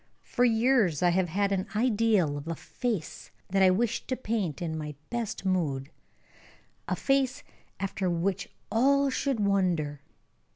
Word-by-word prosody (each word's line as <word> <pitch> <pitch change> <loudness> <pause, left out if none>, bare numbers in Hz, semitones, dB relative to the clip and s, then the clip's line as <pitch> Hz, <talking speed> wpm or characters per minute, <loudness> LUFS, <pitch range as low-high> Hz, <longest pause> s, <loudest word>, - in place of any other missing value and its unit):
For 245 - 0
years 225 - +3
I 175 - +5
have 175 0 +1
had 200 +4 0
an 190 0 0
ideal 215 - +2
of 145 +2 -6
a 165 - -2
face 215 -2 -4 0.2
that 195 +1 +2
I 190 - +7
wished 230 +5 0
to 260 - 0
paint 215 - -2
in 165 -2 -3
my 150 -2 -5 0.2
best 235 -4 -3
mood: 150 -7 0 1.0
a - - 0
face 275 +1 +1 0.4
after 190 -1 -1
which 180 +3 -1 0.2
all 275 +4 +3
should 270 -2 -1
wonder. 180 -8 +1
195 Hz, 150 wpm, -28 LUFS, 170-235 Hz, 1.0 s, I